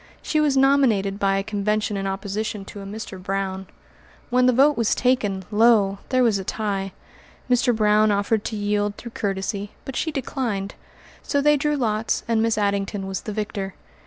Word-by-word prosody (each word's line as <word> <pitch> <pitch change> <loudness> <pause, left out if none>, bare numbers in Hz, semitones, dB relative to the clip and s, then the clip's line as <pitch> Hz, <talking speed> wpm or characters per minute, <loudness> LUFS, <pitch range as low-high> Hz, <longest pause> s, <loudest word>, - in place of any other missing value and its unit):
She 310 - 0
was 290 -3 +2
nominated 245 -8 +3
by 195 -1 +2
a 195 - -1
convention 210 0 -1
in 195 0 -2
opposition 200 +1 -3
to 200 - -9
a - - -8
Mr. 200 -2 -7
Brown. 190 0 -3 0.6
When 250 0 +4
the - - +6
vote 280 +4 +4
was 230 -2 +1
taken, 205 -7 0
lo! 210 -3 +4
there 255 -1 +3
was 220 -5 +3
a - - -4
tie. 195 -2 -3 0.5
Mr. 245 -1 +3
Brown 215 0 +4
offered 205 +1 +1
to 225 - -3
yield 205 0 -1
through 235 - -9
courtesy, 200 0 -3
but 270 - -6
she 320 - -1
declined; 240 -8 -3 0.5
so 285 - 0
they 295 +1 +4
drew 295 +1 0
lots 220 -3 0
and 230 -1 +2
Miss 225 -1 +1
Addington 200 -1 -1
was 190 -1 -4
the 215 - -6
victor. 200 -2 -4
210 Hz, 180 wpm, -23 LUFS, 195-240 Hz, 0.6 s, the